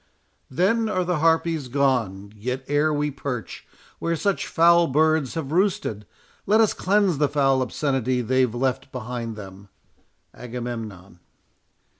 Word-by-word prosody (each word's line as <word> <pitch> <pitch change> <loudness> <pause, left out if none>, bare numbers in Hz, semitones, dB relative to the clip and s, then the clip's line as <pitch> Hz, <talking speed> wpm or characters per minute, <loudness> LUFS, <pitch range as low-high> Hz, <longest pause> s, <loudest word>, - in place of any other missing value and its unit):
Then 220 - +1
are 185 -3 0
the 175 -2 -1
harpies 165 -2 +1
gone—Yet 120 -2 -1
ere 145 +2 +2
we 150 0 0
perch 125 -4 -6 0.3
Where 170 0 -1
such 200 +4 -1
foul 170 0 +5
birds 155 -1 +2
have 155 -4 -4
roosted, 165 - 0 0.4
let 215 +3 +4
us 220 -2 +4
cleanse 195 -5 +1
The 145 -2 +2
foul 135 -2 +2
obscenity 130 -2 -1
they've 125 0 +1
left 130 +1 -1
behind 120 -2 -5
them. 100 -1 -11 0.6
AGAMEMNON. 115 -7 -7
135 Hz, 125 wpm, -24 LUFS, 120-165 Hz, 0.6 s, foul